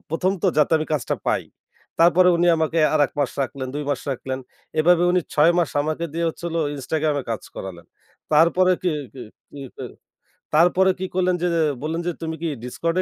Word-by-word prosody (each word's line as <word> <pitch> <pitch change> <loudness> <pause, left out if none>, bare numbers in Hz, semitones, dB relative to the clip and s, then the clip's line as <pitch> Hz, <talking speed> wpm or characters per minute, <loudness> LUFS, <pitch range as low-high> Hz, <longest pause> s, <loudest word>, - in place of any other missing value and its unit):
১ম 180 +4 +1
তো - - +3
যাতে 150 - +3
আমি 155 - -3
কাজটা 150 - -1
পাই। - - 0 0.6
তারপরে 175 +2 +6
উনি 175 +1 +2
আমাকে 160 +1 0 0.2
আর 155 - +3
১ - - -22
মাস 140 -3 +1
রাখলেন, 130 0 -5
২ 150 - -3
মাস 135 - -1
রাখলেন। 130 0 -4 0.4
এভাবে 175 +2 +4
উনি 180 0 +3
৬ 155 +3 +5
মাস 170 - +1
আমাকে 155 +2 -2
দিয়ে 170 +1 -2
হচ্ছে 165 - -8
হল 165 - -4 0.2
Instagram 155 +3 -1
এ - - -8
কাজ 110 - -3
করালেন। 85 -3 -8 0.5
তারপরে 170 +4 +4
কি 180 - +1 0.2
কি 130 - -9 0.3
কি 145 - -9 0.2
কি, - - -6 0.7
তারপরে 180 +4 +4
কি 185 - -3
করলেন 185 -1 +2
যে - - +2 0.4
বললেন 160 +2 -2
যে, 175 - 0
"তুমি 160 0 -3
কি 165 - -1 0.2
Discord 165 +7 -2
160 Hz, 195 wpm, -22 LUFS, 145-175 Hz, 0.7 s, তারপরে